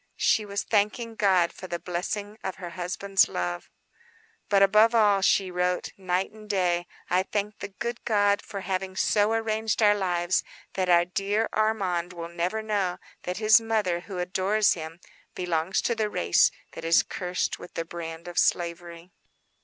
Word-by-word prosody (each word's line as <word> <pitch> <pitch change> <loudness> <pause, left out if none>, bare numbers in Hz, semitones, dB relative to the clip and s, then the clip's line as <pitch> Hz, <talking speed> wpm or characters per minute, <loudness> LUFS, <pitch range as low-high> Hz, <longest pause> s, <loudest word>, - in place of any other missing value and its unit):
She 215 - +2
was 200 0 -2
thanking 220 +2 0
God 190 -5 +2
for 185 - -9
the 175 - -3
blessing 205 +5 -4
of 190 - -3
her 175 -2 -8
husband's 185 +3 +1
love:— 90 -1 -3 0.8
"But 195 -1 +5
above 215 +4 +5
all," 205 -3 +4
she 190 -1 +2
wrote, 180 0 -1
"night 185 0 -1
and 215 -1 -14
day, 175 -3 +1 0.2
I 180 +1 +2
thank 205 +2 -3
the 200 - -5
good 235 +4 -5
God 205 -2 +2
for 200 -2 -7
having 190 0 -3
so 205 +2 +2
arranged 220 -1 -1
our 205 -1 +6
lives 180 -3 0 0.3
that 185 -1 -1
our 175 0 +5
dear 200 +5 -1
Armand 190 -5 0
will 170 -1 -6
never 180 +6 -2
know 200 -4 -1 0.3
that 180 0 -3
his 215 0 +6
mother, 215 -6 0
who 185 +1 -8
adores 190 +4 +2
him, 165 0 -8 0.4
belongs 175 0 -1
to 235 - +1
the 220 -2 -1
race - - +3 0.2
that - - -9
is 165 +1 +4
cursed 180 0 -3
with - - -12
the 165 - -2
brand 165 0 -7
of 175 - -1
slavery." 170 0 -1
190 Hz, 170 wpm, -26 LUFS, 175-210 Hz, 0.8 s, our